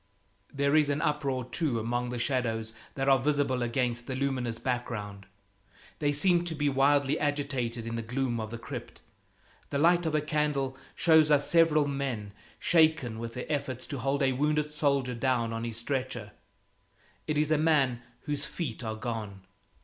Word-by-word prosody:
There 140 Hz, +1 st, +1 dB
is 150 Hz, -2 st, +4 dB
an 145 Hz, +1 st, 0 dB
uproar, 145 Hz, -5 st, -1 dB
too, 125 Hz, 0 st, -1 dB
among 120 Hz, +2 st, -2 dB
some 125 Hz, -, -3 dB
shadows 115 Hz, -3 st, -1 dB, 0.2 s
that 135 Hz, 0 st, -1 dB
are 135 Hz, -1 st, +5 dB
visible 140 Hz, -2 st, +1 dB
against 120 Hz, 0 st, -1 dB
a 130 Hz, -, -2 dB
luminous 130 Hz, -4 st, -1 dB
background; 105 Hz, -6 st, -4 dB, 0.7 s
they 145 Hz, -1 st, +2 dB
seem 175 Hz, +4 st, +3 dB
to 165 Hz, -2 st, -4 dB
be 145 Hz, -1 st, +1 dB
wildly 140 Hz, +1 st, +3 dB
agitated 135 Hz, -6 st, -1 dB
in 115 Hz, -, -4 dB
the 115 Hz, -, -2 dB
gloom 120 Hz, +1 st, -2 dB
of 110 Hz, -1 st, -4 dB
the 115 Hz, -, -6 dB
crypt. -, -, -8 dB, 0.7 s
The 140 Hz, -, -1 dB
light 170 Hz, +3 st, +4 dB
of 155 Hz, -, 0 dB
a 155 Hz, -, +2 dB
candle 150 Hz, -3 st, 0 dB, 0.2 s
shows 160 Hz, -2 st, +5 dB
us 145 Hz, -1 st, +4 dB
several 165 Hz, -3 st, +4 dB
men 130 Hz, -8 st, -3 dB, 0.2 s
shaken 155 Hz, -9 st, +3 dB
with 115 Hz, 0 st, -6 dB
their 125 Hz, -, -4 dB
efforts 135 Hz, -4 st, -2 dB
to 140 Hz, -, -5 dB
hold 140 Hz, +2 st, 0 dB
a 135 Hz, -, +3 dB
wounded 150 Hz, +3 st, 0 dB
soldier 140 Hz, -4 st, +1 dB
down 120 Hz, -2 st, 0 dB
on 115 Hz, +1 st, -3 dB
his 115 Hz, -1 st, -4 dB
stretcher. 125 Hz, -3 st, -3 dB, 1.0 s
It 150 Hz, -1 st, 0 dB
is 150 Hz, +1 st, +2 dB
a 155 Hz, -, +3 dB
man 140 Hz, -6 st, +2 dB, 0.2 s
whose 145 Hz, 0 st, -1 dB
feet 140 Hz, -8 st, -4 dB
are 110 Hz, -1 st, -3 dB
gone. 110 Hz, -4 st, -5 dB
135 Hz, 170 wpm, -29 LUFS, 120-150 Hz, 1.0 s, are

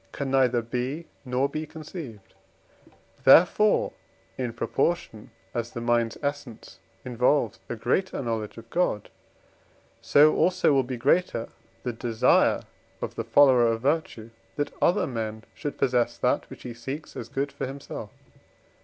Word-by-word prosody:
can 140 Hz, -2 st, -4 dB
neither 125 Hz, -3 st, +3 dB
be, 125 Hz, +7 st, -3 dB, 0.2 s
nor 130 Hz, +1 st, 0 dB
be 155 Hz, +2 st, -5 dB
conceived; 145 Hz, -, -9 dB, 0.9 s
therefore, 180 Hz, +9 st, +5 dB, 0.4 s
in 125 Hz, -2 st, -3 dB
proportion 135 Hz, -4 st, -2 dB, 0.2 s
as 120 Hz, -1 st, -2 dB
the 120 Hz, -, -6 dB
mind's 120 Hz, -1 st, +1 dB
essence 140 Hz, -5 st, -5 dB, 0.3 s
involves 125 Hz, -1 st, +1 dB
a 120 Hz, -, -3 dB
greater 130 Hz, -, -1 dB
knowledge 115 Hz, -3 st, -3 dB
of 115 Hz, 0 st, -11 dB
God, 170 Hz, -, 0 dB, 0.9 s
so 150 Hz, +2 st, +5 dB
also 180 Hz, -4 st, +3 dB
will 135 Hz, -, +4 dB
be 130 Hz, 0 st, -5 dB
greater 130 Hz, -2 st, +1 dB, 0.3 s
the 125 Hz, -, -2 dB
desire 115 Hz, -1 st, +2 dB, 0.4 s
of -, -, -4 dB
the 115 Hz, -, -4 dB
follower 125 Hz, +1 st, +5 dB
of 115 Hz, 0 st, 0 dB
virtue, 135 Hz, -6 st, -1 dB, 0.2 s
that 145 Hz, -, -2 dB
other 180 Hz, +4 st, +3 dB
men 110 Hz, -3 st, -4 dB
should 145 Hz, -2 st, -5 dB
possess 125 Hz, -2 st, +1 dB
that -, -, 0 dB
which -, -, -11 dB
he 120 Hz, -, -6 dB
seeks 135 Hz, +6 st, -7 dB
as 115 Hz, -, -7 dB
good 140 Hz, +2 st, -2 dB
for 140 Hz, -, -4 dB
himself. 135 Hz, +1 st, -7 dB
125 Hz, 140 wpm, -26 LUFS, 115-145 Hz, 0.9 s, therefore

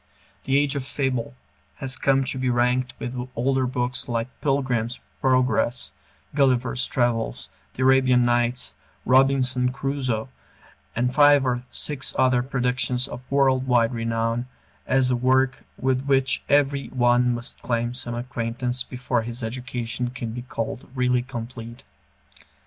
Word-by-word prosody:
"The 135 Hz, +1 st, +2 dB
Age 145 Hz, 0 st, +1 dB
of 140 Hz, -, -2 dB
Fable" 130 Hz, -, -2 dB, 0.4 s
has 135 Hz, 0 st, -1 dB
come 135 Hz, 0 st, +2 dB
to 130 Hz, 0 st, -1 dB
be 130 Hz, 0 st, 0 dB
ranked 125 Hz, +1 st, +1 dB
with 125 Hz, +1 st, -5 dB
older 130 Hz, +2 st, +1 dB
books 125 Hz, 0 st, -1 dB
like 115 Hz, +1 st, -1 dB
"Pilgrim's 130 Hz, -4 st, 0 dB, 0.2 s
Progress," 130 Hz, -2 st, +1 dB, 0.4 s
"Gulliver's 130 Hz, -3 st, +2 dB
Travels," 120 Hz, -3 st, -1 dB, 0.3 s
"The 130 Hz, -, -1 dB
Arabian 130 Hz, -2 st, +4 dB
Nights," 120 Hz, -, +1 dB, 0.3 s
"Robinson 130 Hz, -1 st, +3 dB
Crusoe," 135 Hz, -3 st, -2 dB, 0.7 s
and 125 Hz, +2 st, 0 dB
five 145 Hz, -1 st, +6 dB
or 125 Hz, -1 st, -1 dB
six 145 Hz, -3 st, 0 dB
other 125 Hz, -1 st, +3 dB
productions 125 Hz, -1 st, -1 dB
of -, -, -8 dB
world 130 Hz, -2 st, +2 dB
wide 120 Hz, -1 st, +3 dB
renown 115 Hz, +1 st, -1 dB, 0.4 s
as 130 Hz, -1 st, +3 dB
a -, -, +3 dB
work 130 Hz, +1 st, +1 dB
with 130 Hz, +1 st, 0 dB
which 135 Hz, -1 st, +2 dB
every 140 Hz, -1 st, +2 dB
one 120 Hz, -1 st, +2 dB
must 120 Hz, +2 st, -4 dB
claim 120 Hz, 0 st, -1 dB
some 120 Hz, -1 st, -3 dB
acquaintance 120 Hz, +1 st, -2 dB
before 125 Hz, -1 st, -2 dB
his 120 Hz, +2 st, -5 dB
education 125 Hz, 0 st, -3 dB
can 120 Hz, -2 st, -5 dB
be 120 Hz, +2 st, -5 dB
called 115 Hz, -1 st, -5 dB
really 125 Hz, -1 st, +2 dB
complete. 120 Hz, -2 st, -8 dB
125 Hz, 135 wpm, -24 LUFS, 120-130 Hz, 0.7 s, five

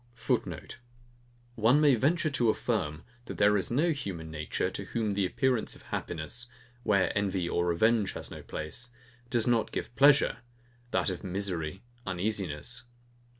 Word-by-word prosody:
[Footnote: 115 Hz, -, -2 dB, 0.7 s
One 120 Hz, +5 st, +4 dB
may 150 Hz, -2 st, +6 dB
venture 155 Hz, +6 st, +2 dB
to 120 Hz, -5 st, +2 dB
affirm, 90 Hz, -10 st, -1 dB, 0.2 s
that -, -, -7 dB
there 105 Hz, 0 st, +5 dB
is 100 Hz, -, +1 dB
no 150 Hz, +8 st, +2 dB
human 90 Hz, -, -4 dB
nature, 75 Hz, -1 st, -2 dB
to -, -, -5 dB
whom 110 Hz, -3 st, -1 dB
the 100 Hz, -1 st, +1 dB
appearance 125 Hz, +3 st, 0 dB
of -, -, -15 dB
happiness 85 Hz, +9 st, -4 dB, 0.3 s
(where 100 Hz, -5 st, +2 dB
envy 95 Hz, -3 st, 0 dB
or 85 Hz, 0 st, 0 dB
revenge 105 Hz, +4 st, +3 dB
has -, -, -4 dB
no -, -, -7 dB
place) 100 Hz, +11 st, -4 dB, 0.4 s
does 120 Hz, -2 st, +3 dB
not 120 Hz, -2 st, +2 dB
give 120 Hz, -, -4 dB
pleasure, 140 Hz, +4 st, +5 dB, 0.5 s
that 100 Hz, -, +1 dB
of 90 Hz, -, -6 dB
misery, 95 Hz, -2 st, -3 dB, 0.2 s
uneasiness. 95 Hz, +1 st, -2 dB
105 Hz, 150 wpm, -30 LUFS, 90-120 Hz, 0.7 s, may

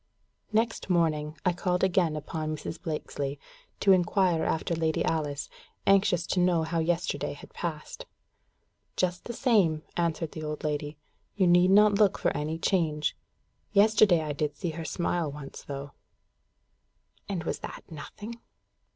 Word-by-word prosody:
Next 225 Hz, -1 st, 0 dB
morning, 155 Hz, -3 st, +1 dB
I 180 Hz, -, +3 dB
called 180 Hz, +1 st, -1 dB
again 175 Hz, -4 st, +2 dB
upon 155 Hz, +1 st, -3 dB
Mrs. 155 Hz, -, -7 dB
Blakesley, 145 Hz, -4 st, -4 dB, 0.4 s
to 195 Hz, -, +5 dB
inquire 180 Hz, -2 st, +3 dB
after 160 Hz, +1 st, 0 dB
Lady 160 Hz, -1 st, 0 dB
Alice, 145 Hz, -3 st, -1 dB, 0.4 s
anxious 195 Hz, -3 st, +4 dB
to 185 Hz, -, 0 dB
know 175 Hz, -2 st, +3 dB
how 165 Hz, +1 st, -1 dB
yesterday 170 Hz, +1 st, -1 dB
had 145 Hz, -, -13 dB
passed. 170 Hz, -, -5 dB, 0.9 s
"Just 180 Hz, -1 st, 0 dB
the 235 Hz, -, -5 dB
same," 200 Hz, -, +2 dB
answered 165 Hz, -2 st, -1 dB
the 155 Hz, -, -7 dB
old 150 Hz, 0 st, -4 dB
lady. 150 Hz, 0 st, -2 dB, 0.4 s
"You 195 Hz, -, +3 dB
need 175 Hz, +1 st, +5 dB
not 205 Hz, +1 st, +6 dB
look 205 Hz, -3 st, +4 dB
for -, -, 0 dB
any 155 Hz, +2 st, -2 dB
change. 160 Hz, -4 st, 0 dB, 0.6 s
Yesterday 205 Hz, -4 st, +5 dB
I 150 Hz, -1 st, -3 dB
did 150 Hz, 0 st, -2 dB
see 170 Hz, -, -2 dB
her 165 Hz, 0 st, -6 dB
smile 170 Hz, -3 st, -1 dB
once, 140 Hz, -1 st, -9 dB
though." 140 Hz, 0 st, -6 dB, 1.4 s
And 185 Hz, -5 st, -2 dB
was -, -, -3 dB
that -, -, -8 dB
nothing? 210 Hz, +9 st, -8 dB
165 Hz, 145 wpm, -28 LUFS, 155-185 Hz, 1.4 s, not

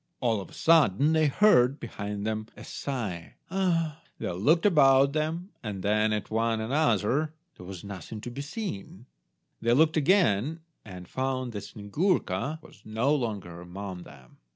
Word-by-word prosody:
All 115 Hz, -5 st, +1 dB
of -, -, -10 dB
a -, -, -16 dB
sudden 155 Hz, -, +4 dB
they 160 Hz, -1 st, +4 dB
heard, 140 Hz, -6 st, +4 dB
behind 105 Hz, -2 st, -5 dB
them, 110 Hz, 0 st, -2 dB
a -, -, -10 dB
sigh— 105 Hz, -12 st, -5 dB, 0.2 s
"Ah!" 165 Hz, -5 st, 0 dB, 0.2 s
They -, -, -3 dB
looked 145 Hz, -, +2 dB
about 140 Hz, -6 st, +5 dB
them, 160 Hz, +5 st, -2 dB
and 100 Hz, -5 st, -5 dB
then 110 Hz, +1 st, +2 dB
at 105 Hz, 0 st, -3 dB
one 115 Hz, 0 st, +1 dB
another. 135 Hz, +3 st, +1 dB, 0.2 s
There 90 Hz, -, -12 dB
was 95 Hz, -3 st, -8 dB
nothing 100 Hz, +1 st, -7 dB
to 120 Hz, -, -6 dB
be 140 Hz, -, -5 dB
seen. 140 Hz, -, -6 dB, 0.6 s
They 115 Hz, +1 st, +3 dB
looked 160 Hz, +4 st, +4 dB
again, 155 Hz, -, +2 dB, 0.2 s
and 90 Hz, -4 st, -10 dB
found 130 Hz, -1 st, -2 dB
that 105 Hz, -3 st, -6 dB
Snyegurka 145 Hz, -, -1 dB
was -, -, -16 dB
no 115 Hz, +7 st, 0 dB
longer 100 Hz, -, -3 dB
among 90 Hz, +1 st, -7 dB
them. 70 Hz, -7 st, -15 dB
120 Hz, 155 wpm, -28 LUFS, 100-155 Hz, 0.6 s, about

